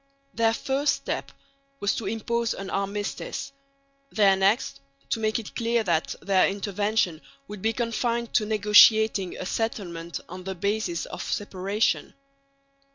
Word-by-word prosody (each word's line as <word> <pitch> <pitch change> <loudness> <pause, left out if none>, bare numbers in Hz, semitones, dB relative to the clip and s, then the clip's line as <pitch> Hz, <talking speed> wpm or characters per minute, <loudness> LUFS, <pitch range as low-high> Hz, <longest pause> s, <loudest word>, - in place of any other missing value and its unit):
Their 225 0 +2
first 275 +4 +1
step - - -4 0.5
was 205 - +1
to 215 - -4
impose 230 +2 -1
an 195 -1 -6
armistice; 200 +7 -3 0.6
their 200 -3 +5
next 195 - +1 0.3
to 230 - +1
make 220 0 +1
it 225 -3 -8
clear 235 -1 +1
that 170 -5 0
their 190 -1 +4
intervention 200 -3 -1 0.3
would 210 -2 -8
be 225 - +2
confined 235 0 -1
to 215 - +2
negotiating 210 -2 +5
a - - -5
settlement 175 -6 -3
on 185 +1 -8
the 190 0 -4
basis 200 -2 -1
of - - -7
separation. 200 +1 -1
210 Hz, 135 wpm, -26 LUFS, 195-225 Hz, 0.6 s, their